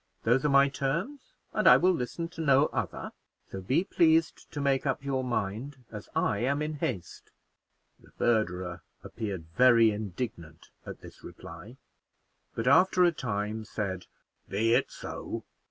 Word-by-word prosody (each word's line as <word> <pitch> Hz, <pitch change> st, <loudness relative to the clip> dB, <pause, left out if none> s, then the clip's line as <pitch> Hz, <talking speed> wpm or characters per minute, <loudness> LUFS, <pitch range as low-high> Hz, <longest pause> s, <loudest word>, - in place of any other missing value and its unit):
Those 125 Hz, +4 st, +2 dB
are 150 Hz, -, +2 dB
my 140 Hz, 0 st, +5 dB
terms, 180 Hz, -, -4 dB, 0.2 s
and -, -, +1 dB
I -, -, +9 dB
will 185 Hz, -, +3 dB
listen 165 Hz, +3 st, -3 dB
to 165 Hz, -1 st, -8 dB
no 140 Hz, -2 st, +4 dB
other; -, -, -4 dB, 0.4 s
so 95 Hz, -, -6 dB
be 135 Hz, -, +1 dB
pleased 165 Hz, -4 st, +1 dB
to 145 Hz, -, -5 dB
make 140 Hz, -2 st, +1 dB
up 135 Hz, +1 st, -1 dB
your 135 Hz, -2 st, -1 dB
mind, 125 Hz, +3 st, -4 dB
as 105 Hz, -2 st, -9 dB
I 100 Hz, -, +1 dB
am 140 Hz, +5 st, 0 dB
in 155 Hz, 0 st, -3 dB
haste." 90 Hz, -9 st, -5 dB, 0.7 s
The -, -, -20 dB
verderer 90 Hz, -6 st, 0 dB, 0.2 s
appeared 100 Hz, -7 st, -5 dB
very 120 Hz, -3 st, +6 dB
indignant 100 Hz, -5 st, -6 dB, 0.2 s
at -, -, -8 dB
this -, -, -14 dB
reply, -, -, -11 dB, 0.8 s
but 115 Hz, -, -3 dB
after 180 Hz, +6 st, +5 dB
a 175 Hz, -, +5 dB
time 110 Hz, -6 st, -3 dB
said, 100 Hz, -4 st, -5 dB, 0.4 s
"Be 110 Hz, +4 st, +1 dB
it -, -, +2 dB
so." -, -, -7 dB
125 Hz, 155 wpm, -29 LUFS, 105-145 Hz, 0.8 s, I